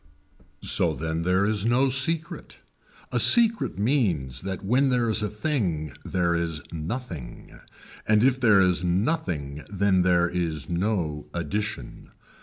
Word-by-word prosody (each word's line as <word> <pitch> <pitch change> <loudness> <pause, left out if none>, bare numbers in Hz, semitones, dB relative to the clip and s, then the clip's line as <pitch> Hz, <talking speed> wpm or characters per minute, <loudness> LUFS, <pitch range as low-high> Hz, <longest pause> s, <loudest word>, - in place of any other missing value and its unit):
So - - +1
then 80 0 -3
there 90 +3 +2
is 105 -1 0
no 120 +4 +3
secret. 155 +6 -2 0.5
A - - +1
secret 230 - +4
means 95 - 0
that 95 0 -5
when 130 +6 +3
there 125 -2 +1
is 110 - 0
a 105 - -1
thing 105 - -2
there 85 -2 0
is 85 -2 -2
nothing 80 - -7 0.5
and 105 0 +4
if 130 0 +3
there 110 -6 +5
is 90 -1 +2
nothing 85 - -1
then 100 -2 +2
there 90 -1 +3
is 85 -4 -3
no 85 -5 -2
addition. 85 - -4
95 Hz, 135 wpm, -25 LUFS, 85-120 Hz, 0.5 s, there